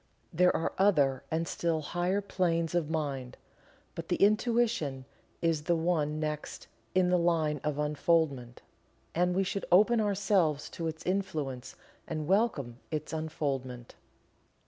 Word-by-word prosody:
There 180 +2 +4
are 160 - -1
other 145 -10 +3
and 165 +1 -1
still 165 -2 -1
higher 175 +6 -1
planes 170 -4 0
of 170 -4 0
mind, 140 -6 -3 0.6
but - - -7
the - - +2
Intuition 215 - +1 0.4
is 160 -2 +1
the 170 - +2
one 160 -3 0
next 150 -1 -4 0.3
in 180 -1 +3
the 180 - +4
line 160 -4 +1
of 150 -1 -1
unfoldment, 150 -4 0 0.5
and 180 +1 +1
we 195 - +2
should 195 +1 -3
open 215 +5 +5
ourselves 195 -7 +1
to 165 - -4
its 160 0 -6
influence 155 -10 -3 0.3
and 155 -2 -3
welcome 155 - 0
its 155 0 -4
unfoldment. 135 -6 -3
160 Hz, 135 wpm, -30 LUFS, 150-180 Hz, 0.6 s, open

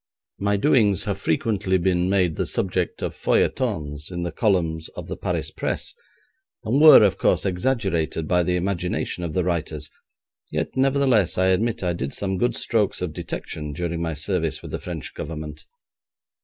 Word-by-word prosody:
My 100 +1 +1
doings 105 - +3
have 100 -1 -2
frequently 105 -10 +1
been 90 0 +1
made 90 -5 +2
the - - -1
subject 90 -2 -1
of - - -2
feuilletons 75 0 0
in 85 -1 -4
the 85 - -3
columns 80 -5 0
of - - -6
the - - -4
Paris - - -3
Press, - - -3 0.7
and 130 +7 +1
were, 155 -7 +10
of 100 -2 +2
course, - - +2
exaggerated 90 -6 0
by 90 +1 +3
the 90 +1 0
imagination 90 -1 -2
of 85 -3 -3
the 90 - +1
writers, 80 -4 -3 0.6
yet, 75 +1 -3
nevertheless, 135 -6 +2
I 95 +1 +3
admit 105 +3 +1
I 90 -1 +1
did 70 -5 -4
some 95 -2 -2
good 120 +1 +1
strokes 105 -5 0
of 85 -4 -3
detection 75 -1 -5
during 85 +2 -3
my 80 -2 -2
service 80 0 -2
with - - -8
the - - -3
French - - -6
Government. 75 -1 -7
90 Hz, 170 wpm, -23 LUFS, 80-100 Hz, 0.7 s, were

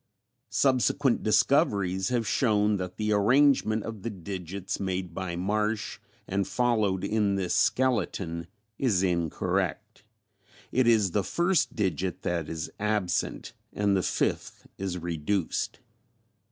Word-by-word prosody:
(Subsequent 135 0 +2
discoveries 100 -4 +2
have 120 -2 0
shown 105 -2 +2
that 90 -1 -5
the 105 0 -1
arrangement 110 0 +3
of 110 -3 -6
the 115 - -3
digits 95 0 -5
made 95 -2 -3
by 90 -1 -4
Marsh 105 +4 -1 0.3
and 100 0 -1
followed 110 -6 +1
in 105 -1 +1
this 95 -2 -1
skeleton 95 -9 0 0.3
is 105 -9 +2
incorrect. 85 +3 -1 0.7
It 130 -1 +2
is 110 -5 +4
the 100 +2 +1
first 175 - +1
digit 95 -3 -1
that 85 -3 -2
is 80 -1 -4
absent, 105 -4 -1 0.2
and 100 -1 +1
the 95 - +2
fifth - - -2
is 95 -2 -3
reduced.) 85 +2 -2
100 Hz, 120 wpm, -28 LUFS, 90-110 Hz, 0.7 s, is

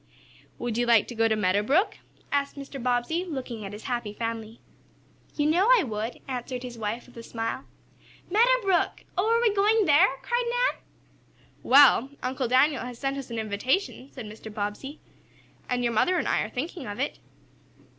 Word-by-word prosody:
"Would 240 -1 -3
you 240 - +1
like 230 -3 +5
to - - -5
go 225 0 +2
to 220 - +1
Meadow 200 -1 +2
Brook?" 300 - +1 0.3
asked 280 0 0
Mr. 275 -1 -8
Bobbsey, 250 +8 0
looking 260 - -6
at 195 - -6
his 210 +1 -9
happy 240 -4 -3
family. 225 0 -5 0.8
"You 295 - +1
know 345 +7 +3
I - - +6
would," 220 -2 -4
answered 250 -1 -4
his 245 -1 -7
wife, 225 +1 -4
with 250 - -19
a - - -6
smile. 230 +2 -4 0.6
"Meadow 485 +6 +4
Brook! 380 -3 +1
Oh, 395 +4 +1
are 465 - +4
we 465 -3 +3
going 420 +1 +3
there?" 310 +4 +6 0.2
cried 485 0 0
Nan. - - 0 0.8
"Well, 270 -1 +6
Uncle 255 0 -1
Daniel 265 +4 +3
has 250 -1 -7
sent 275 +1 -2
us 275 -2 -6
an 230 - -5
invitation," 250 - -1
said 250 -5 -8
Mr. 215 +1 -10
Bobbsey, 210 +8 -5 0.7
"and 245 0 0
your 235 -1 0
mother 360 +12 +2
and - - -1
I - - +2
are - - -3
thinking 305 +2 -5
of 205 +3 -6
it." 280 - -2
255 Hz, 185 wpm, -26 LUFS, 230-320 Hz, 0.8 s, I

